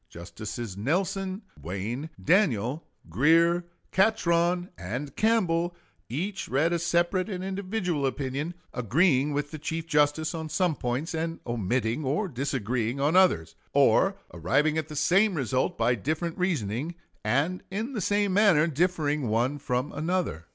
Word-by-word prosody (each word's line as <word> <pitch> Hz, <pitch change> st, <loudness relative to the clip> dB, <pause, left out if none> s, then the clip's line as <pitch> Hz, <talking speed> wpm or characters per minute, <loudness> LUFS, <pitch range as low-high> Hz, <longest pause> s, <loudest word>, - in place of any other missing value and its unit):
Justices 110 Hz, +4 st, -7 dB
Nelson, 185 Hz, -, -1 dB, 0.2 s
Wayne, 105 Hz, -, -4 dB
Daniel, 150 Hz, -, +1 dB, 0.2 s
Grier, 165 Hz, -, +3 dB, 0.2 s
Catron, 180 Hz, -3 st, +2 dB
and 125 Hz, +9 st, -5 dB
Campbell 175 Hz, -6 st, +1 dB, 0.3 s
each 185 Hz, -, -3 dB
read 155 Hz, +6 st, +2 dB
a 170 Hz, -, +1 dB
separate 175 Hz, +3 st, +1 dB
and 185 Hz, -2 st, -4 dB
individual 190 Hz, -6 st, -1 dB
opinion, 140 Hz, +5 st, -3 dB, 0.2 s
agreeing 140 Hz, -, +2 dB
with 145 Hz, 0 st, -2 dB
the 155 Hz, -, -6 dB
Chief 160 Hz, +2 st, -3 dB
Justice 155 Hz, 0 st, +2 dB
on 160 Hz, -1 st, -5 dB
some 180 Hz, 0 st, +1 dB
points, 130 Hz, +8 st, -2 dB
and 165 Hz, +1 st, -3 dB
omitting 120 Hz, +3 st, -1 dB
or 150 Hz, +10 st, 0 dB
disagreeing 125 Hz, -, -2 dB
on 145 Hz, +5 st, +2 dB
others, 135 Hz, -, +4 dB, 0.2 s
or -, -, +4 dB, 0.2 s
arriving 135 Hz, -, +1 dB
at 160 Hz, -1 st, -1 dB
the 155 Hz, -, -8 dB
same 185 Hz, +7 st, +3 dB
result 130 Hz, -3 st, 0 dB
by 115 Hz, +2 st, +3 dB
different 155 Hz, -, -2 dB
reasoning, 155 Hz, -, -1 dB, 0.3 s
and 140 Hz, +12 st, 0 dB
in 220 Hz, +7 st, -3 dB
the 215 Hz, -, -2 dB
same 205 Hz, +1 st, +1 dB
manner 195 Hz, -7 st, +5 dB
differing 150 Hz, -4 st, 0 dB
one 120 Hz, +6 st, +1 dB
from 125 Hz, +2 st, -2 dB
another. 160 Hz, -, -2 dB
155 Hz, 135 wpm, -27 LUFS, 125-180 Hz, 0.3 s, manner